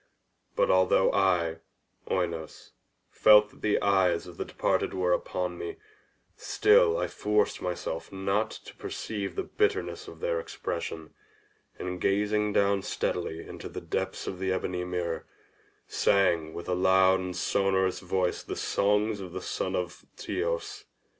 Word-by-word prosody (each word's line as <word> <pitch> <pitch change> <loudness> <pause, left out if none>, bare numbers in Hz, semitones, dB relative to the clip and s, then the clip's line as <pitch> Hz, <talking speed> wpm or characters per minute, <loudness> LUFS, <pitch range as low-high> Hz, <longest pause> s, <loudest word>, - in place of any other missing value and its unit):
But - - +3
although 95 0 +4
I, 90 -4 +2 0.5
Oinos, 85 -4 -3 0.4
felt 105 0 +6
that - - -20
the 105 - +2
eyes 95 -4 +3
of 90 -2 -11
the - - -3
departed - - 0
were 90 -1 +2
upon 90 0 -2
me, 85 - -5 0.6
still 460 +2 +4
I - - 0
forced 105 0 0
myself 85 -2 -4
not 100 +3 0
to - - -11
perceive 100 -3 -5
the - - -1
bitterness 420 0 -1
of - - -11
their 485 0 0
expression, 475 - -5 0.6
and 90 -1 -5
gazing 105 +1 +1
down 100 -1 +2
steadily 85 -3 -3
into - - -8
the - - -6
depths 95 0 -3
of 90 - -5
the 95 0 0
ebony 90 -1 -2
mirror, 90 -2 -3 0.6
sang 85 -5 +2
with 85 - -7
a 90 - 0
loud 95 +1 +4
and 90 -1 -4
sonorous 95 0 +1
voice 90 -1 -1
the - - -6
songs 105 +1 +1
of 90 -3 -8
the 95 - -3
son - - -2
of 90 -1 -4
Teios. 420 -1 -3
95 Hz, 145 wpm, -28 LUFS, 90-105 Hz, 0.6 s, felt